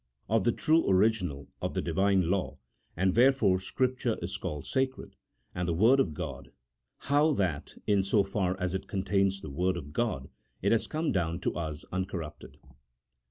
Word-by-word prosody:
OF 110 -2 +1
THE 120 - +4
TRUE 160 +7 +3
ORIGINAL 95 - +1
OF - - -3
THE - - +1
DIVINE 95 +1 +2
LAW, 100 -2 -1 0.4
AND 95 +1 +2
WHERE 125 +4 +7
FORE 100 -9 +2
SCRIPTURE 125 +3 -1
IS 90 +3 -3
CALLED 75 -6 -5
SACRED, 130 0 -2 0.4
AND 90 -1 -2
THE 85 - 0
WORD 115 +10 +5
OF 85 - +1
GOD. - - -6 0.5
HOW 150 +2 +2
THAT, 90 - -2
IN 100 -2 +3
SO 100 +1 +2
FAR 95 -1 -1
AS 90 -1 -1
IT 95 - -4
CONTAINS 95 0 0
THE 75 - -7
WORD 90 +4 0
OF 75 -2 -8
GOD, 105 - -1 0.3
IT 100 - +3
HAS 115 - +2
COME 155 +1 -1
DOWN 85 -3 -1
TO - - -1
US 80 -3 -4
UNCORRUPTED. 90 -4 -5
95 Hz, 175 wpm, -29 LUFS, 90-115 Hz, 0.5 s, WHERE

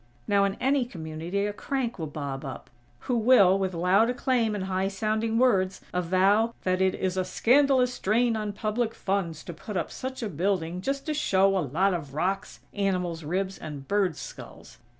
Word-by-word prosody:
Now, 200 -1 +3
in 195 0 -1
any 270 0 +1
community 170 0 -4
a 205 - -2
crank 245 -1 -3
will 160 - -3
bob 140 -2 -5
up, 135 -3 -8 0.3
who 250 - -1
will, 215 -5 +5
with 190 -2 -1
loud 185 +7 +3
acclaim 245 -3 +1
and 200 - -3
high 190 0 -1
sounding 215 +3 -1
words, 195 -7 +2
avow 190 +6 +2
that 185 0 +1
it 190 0 +2
"is 185 0 -2
a 185 - +2
scandalous 250 +6 +3
drain 230 +3 +2
on 210 -1 -2
public 220 +2 -2
funds 180 -5 -2
to 175 - -7
put 190 +5 -6
up 170 - -2
such 260 -1 -5
a 220 - -2
building 180 0 -1
just 275 +6 -2
to 310 - -1
show 195 -9 +3
a - - +2
lot 180 +6 +1
of 145 -6 -5
rocks, 190 +5 -2
animals' 180 -5 -1
ribs 190 +5 -2
and 145 -3 -8
birds' 195 -6 +1
skulls." - - -11
195 Hz, 185 wpm, -27 LUFS, 180-225 Hz, 0.3 s, will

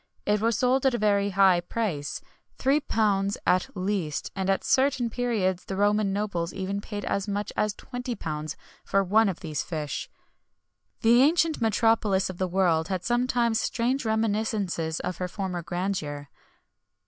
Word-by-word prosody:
[XXI - - +1
80] - - +5
It 210 - 0
was 230 -1 +2
sold 255 +2 +2
at 260 - +2
a - - 0
very 205 -2 +2
high 190 -2 +4
price, 175 -9 -3 0.4
£3 215 -8 +1
at 185 0 +2
least, 185 -5 -2
and 190 -1 -2
at 195 - +1
certain 260 -3 +2
periods 210 -8 -1
the 195 - -4
Roman 205 0 +2
nobles 195 -4 -2
even 195 +1 -3
paid 205 -1 -6
as 200 +1 -1
much 205 +1 -3
as 210 -1 0
£20 165 - -5 0.3
for 195 0 +2
one 210 +3 +4
of 180 - -5
these 155 -5 -3
fish.[XXI 155 +6 -8
81] 230 - +7
The 240 - +6
ancient 320 0 +3
metropolis 220 -3 +2
of 175 - -13
the 185 - +1
world 175 -3 +2
had 185 -2 -2
sometimes 240 -1 +1
strange 250 +3 0
reminiscences 215 -7 -1
of 180 - -4
her 180 - -2
former 180 -2 -4
grandeur. 165 -5 -3
200 Hz, 160 wpm, -26 LUFS, 185-225 Hz, 0.4 s, 81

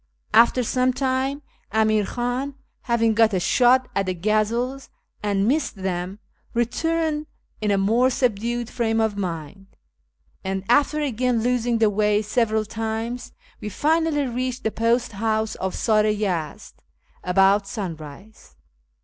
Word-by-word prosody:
After 235 +3 +5
some 255 +2 +1
time, 265 +2 -1 0.3
Amir 215 -1 +2
Khan, 250 +3 -3 0.3
having 230 -1 +3
got 220 -2 +3
a - - +2
shot 250 +6 +4
at 195 -1 0
the 185 - -1
gazelles 220 +8 -1 0.3
and 200 -1 0
missed 295 +2 0
them, 185 0 -3 0.4
returned 310 +5 0 0.3
in 210 - 0
a 200 - +3
more 225 +6 +3
subdued 240 -1 -1
frame 225 -2 -1
of 220 -2 +1
mind; 185 0 -5 0.8
and, 190 0 -3
after 290 +4 +3
again 250 -4 0
losing 245 -1 +1
the 220 -2 +3
way 210 +1 +2
several 220 0 +1
times, 225 +3 -4 0.3
we 210 - -5
finally 310 - +1
reached 255 +1 -3
the 220 - 0
post 230 +2 +1
house 220 +1 -1
of 190 0 -4
Sar 215 -2 +2
i 215 0 +2
Yezd 180 -8 -3 0.5
about 195 +2 +3
sunrise. 180 - -8
225 Hz, 135 wpm, -23 LUFS, 205-250 Hz, 0.8 s, After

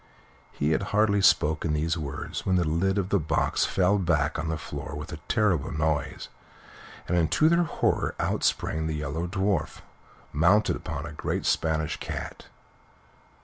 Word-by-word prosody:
He 75 +2 -1
had 80 - +1 0.2
hardly 100 -1 +3
spoken 80 -3 +3
these 80 +2 0
words 75 -5 -5
when 95 - +1
the 90 - +3
lid 95 +5 +1
of 95 -2 -1
the 100 - +2
box 75 -1 +1
fell 95 +2 +2
back 85 -3 +1
on 80 - -2
the 80 0 -1
floor 70 -2 -7
with 75 +1 -7
a - - -5
terrible 95 -10 +1
noise, 75 -2 -1 0.8
and 85 -2 +1
to 155 - +4
their 170 +1 +3
horror - - 0
out - - -1
sprang 80 0 0
the 80 - -2
Yellow 75 +3 -3
Dwarf, 95 -2 -1 0.5
mounted 95 +8 +3
upon 80 -3 -5
a 80 - -7
great - - -3
Spanish 80 -1 0
cat. - - -6
80 Hz, 160 wpm, -27 LUFS, 75-95 Hz, 0.8 s, to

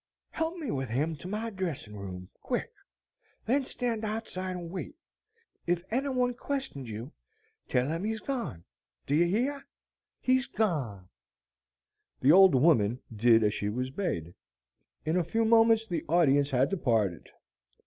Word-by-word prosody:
"Help 325 +2 -2
me 300 -8 -4
with 130 -3 -2
him 150 +8 0
to 155 - -9
my 215 +4 -3
dressing 170 - -4
room, 90 -2 -7
quick; - - -2 0.7
then 265 +3 +2
stand 235 -4 -2
outside 210 -4 -3
and 170 -2 -6
wait. 190 +10 -6 0.7
If 175 0 +1
any 270 +4 0
one 250 -2 +1
questions 255 - -4
you, 110 +6 -6 0.6
tell 125 0 +1
them 165 +4 -2
he's 220 +1 -2
gone. 235 - -4 0.4
Do 140 - -1
you 165 +4 +5
hear? 260 +9 0 0.6
HE's 260 0 +2
gone." 135 - -1 1.1
The 135 - +5
old 190 -3 +8
woman 125 -5 +4 0.2
did 115 +1 +5
as 105 -1 +2
she 105 - -2
was 125 +4 -3
bade. 90 - -3 0.7
In 160 +3 +1
a 180 - +2
few 225 +7 0
moments 225 0 +5
the 175 -7 -3
audience 145 -4 +4
had 130 0 +2
departed. 115 - 0
170 Hz, 150 wpm, -29 LUFS, -, 1.1 s, old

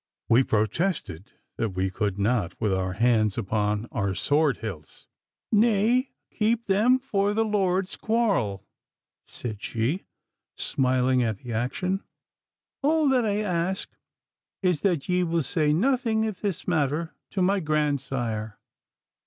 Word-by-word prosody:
We 115 +3 +6
protested 110 - -1 0.3
that 110 -5 -2
we 95 0 0
could 100 0 -2
not, 100 -3 0
with 105 -4 +1
our 95 0 -1
hands 110 -1 +2
upon 105 +2 0
our 100 -4 -1
sword 145 +5 +2
hilts. 95 -9 -8 0.5
'Nay, 225 +4 +3 0.2
keep 225 +1 0
them 215 +6 +4
for 205 -6 0
the 225 0 +2
Lord's 190 -2 0
quarrel,' 200 - 0 0.6
said 110 -4 -6
she, 120 - -2 0.5
smiling 130 -1 +1
at 110 -4 0
the 120 +2 -7
action. 180 - -1 0.8
'All 310 +1 +3
that 255 -3 +3
I 210 0 0
ask 185 -1 -2 0.7
is 180 -5 +2
that 175 -8 0
ye 180 0 +2
will 170 -2 0
say 150 +2 +1
nothing 225 - +2
if 215 -4 -3
this 200 -5 -3
matter 160 -1 0 0.2
to 190 - -1
my 195 +2 +3
grandsire. 135 - -1
155 Hz, 130 wpm, -26 LUFS, -, 0.8 s, We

